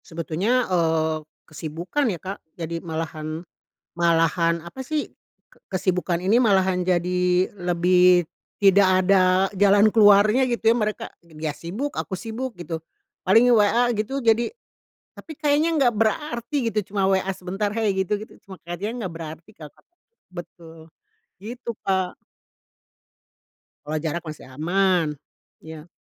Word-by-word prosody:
Sebetulnya, 180 +10 -1
eee, 160 -3 +1 0.3
kesibukan 165 - -3
ya, 185 - -2
Kak, 195 +2 -6 0.2
jadi 165 0 -4
malahan 160 0 -5 0.5
malahan, 170 0 +2
apa 170 +10 -10
sih 305 +2 -2 0.6
kesibukan 185 -2 -1
ini 205 +7 +3
malahan 190 -5 +2
jadi 180 0 +1
lebih 180 0 +4 0.3
tidak 195 -1 +5 0.2
ada 185 0 +3
jalan 205 +2 +4
keluarnya 215 +4 +5
gitu 230 -2 +2
ya, - - 0
mereka 215 -2 -2 0.2
ya 160 -2 -6
sibuk, 210 - -5
aku 190 - -5
sibuk 230 +4 -6
gitu, 170 -2 -6 0.4
paling 225 +6 +4
WA 235 +2 +3
gitu 230 +5 -2
jadi, 230 +1 +3 0.7
tapi 315 - -10
kayaknya 300 +2 +1
nggak 260 -6 +3
berarti 235 +3 -1 0.2
gitu 210 -2 -4
cuma 195 -1 +2
WA 190 0 +1
sebentar, 190 +4 -3
hey 220 -3 +1
gitu 190 +1 -1
gitu 215 +1 -10
cuma 190 - -9
kayak 175 +1 -6
dia 205 +3 -3
nggak 210 -8 -5
berarti 165 +3 -9
kalo 160 -7 -11
kata - - -30 0.4
betul 165 -2 -11 0.5
gitu, 235 +5 -7 0.2
Kak. 190 -2 0 1.7
Kalau 155 +1 -2
jarak 160 +2 -3
masih 155 - -9
aman, 175 +5 +1 0.5
iya. 160 0 -11
185 Hz, 130 wpm, -23 LUFS, 170-220 Hz, 1.7 s, tidak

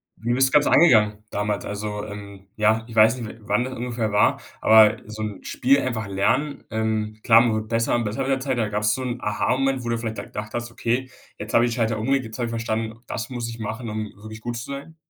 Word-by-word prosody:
wie 120 +1 -3
bist 130 +2 +4
du - - -14
das - - -13
Ganze - - +1
angegangen 105 -9 +5
damals. 105 0 -2
Also, 105 0 -4
ähm, 100 -2 -10
ja, 110 +1 +2
ich 115 - -10
weiß 110 +3 +6
nicht, 115 - -5
w 115 - -11
wann 105 +4 +1
das 130 +1 -5
ungefähr 115 -2 -2
war, 105 0 +3 0.2
aber 110 0 +7
so 110 0 -6
'n 105 -3 -6
Spiel 135 +3 +2
einfach 110 -5 -3
lernen, 115 +10 0
ähm, 110 -1 -2
klar, 115 -2 +7
man 120 -2 +2
wird 110 0 -3
besser 115 +1 +1
und 120 - 0
besser 110 +6 -3
mit 135 - -1
der 135 - +2
Zeit, 130 -2 -2
aber 110 - 0
gab's 105 0 +1
so 130 - -3
'n 125 -1 -3
Aha-Moment, 130 +5 0
wo 120 - -4
du 115 - 0
vielleicht 115 -1 -4
da - - -5
gedacht 105 0 -7
hast: 120 0 -4
„Okay, 125 +3 -1 0.3
jetzt 105 0 -7
habe 115 +1 +6
ich 120 - -1
die - - -3
Schalter 115 -2 0
umgelegt. 135 +3 +1
Jetzt 110 +1 -8
habe 120 - -1
ich 115 - -4
verstanden, 115 -1 -3
das 120 +2 -4
muss 120 -2 -4
ich 115 0 -8
machen, 110 +2 -5
um 110 0 -3
wirklich 110 +1 -10
gut 120 +1 -4
zu 115 - -5
sein?“ 140 +4 -7
115 Hz, 260 wpm, -23 LUFS, 105-120 Hz, 0.3 s, aber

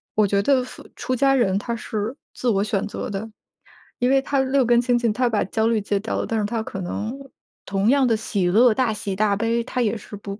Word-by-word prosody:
我 215 - +4
觉 200 0 +1
得 260 +3 +3
服 255 - -11
出 255 +1 -3
家 270 +2 +3
人 195 -7 +2
他 235 +2 -3
是， 220 +2 -4 0.2
自 255 - -4
我 200 -2 +2
选 210 0 -1
择 - - -5
的。 205 +2 -5 0.7
因 245 +1 +2
为 270 0 +4
他 275 0 -1
六 265 0 +2
根 240 0 +4
清 245 0 +2
净， 235 -2 +1
他 245 +3 +1
把 220 -3 +1
焦 220 +3 0
虑 225 -2 +1
戒 200 0 -1
掉 220 - -3
了， - - -3
但 225 -1 -1
是 205 - 0
他 225 +1 -2
可 195 -3 -6
能， 215 +8 -4 0.5
同 195 +3 0
样 275 -1 +4
的 225 - +3
喜 205 -4 -2
乐， 230 +7 +5
大 235 -2 +1
喜、 200 -2 -4
大 205 0 +2
悲， 230 +2 0
他 250 +1 -3
也 225 0 0
是 210 - -10
不 200 +1 -8
225 Hz, 265 characters per minute, -22 LUFS, 205-245 Hz, 0.7 s, 乐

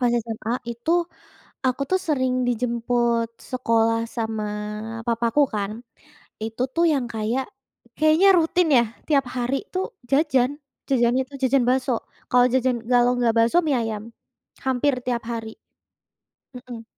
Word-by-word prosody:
pas 245 - +4
SMA 225 0 -4 0.2
itu 235 +6 -4 0.8
aku 255 +2 0
tuh 375 0 +2
sering 260 -4 +1
dijemput 235 -1 0 0.2
sekolah 230 -2 +2 0.2
sama 220 -2 -2 0.6
papaku 235 +3 +1
kan 200 -1 -1 0.7
itu 225 +2 -3
tuh 335 - +3
yang 270 -4 0
kayak, 225 +5 -1 0.5
kayaknya 310 +5 +5
rutin 335 +1 +2
ya 235 - +5 0.2
tiap 280 -4 +3
hari 245 +2 0 0.2
tuh 370 +1 0 0.3
jajan, 275 -3 +3 0.4
jajannya 250 0 +3
itu 280 - -17
jajan 260 0 +3
bakso. 255 0 +2 0.4
Kalau 245 0 +5
jajan 255 -1 +2 0.2
kalau 245 0 +5
nggak 235 -2 +2
bakso 230 +8 +4
mie 285 -3 +2
ayam, 220 -2 -3 0.6
hampir 265 +2 +2
tiap 240 -2 -1
hari. 225 -1 -4 1.1
Mhm. 245 -2 -9
245 Hz, 130 wpm, -23 LUFS, 230-265 Hz, 1.1 s, kayaknya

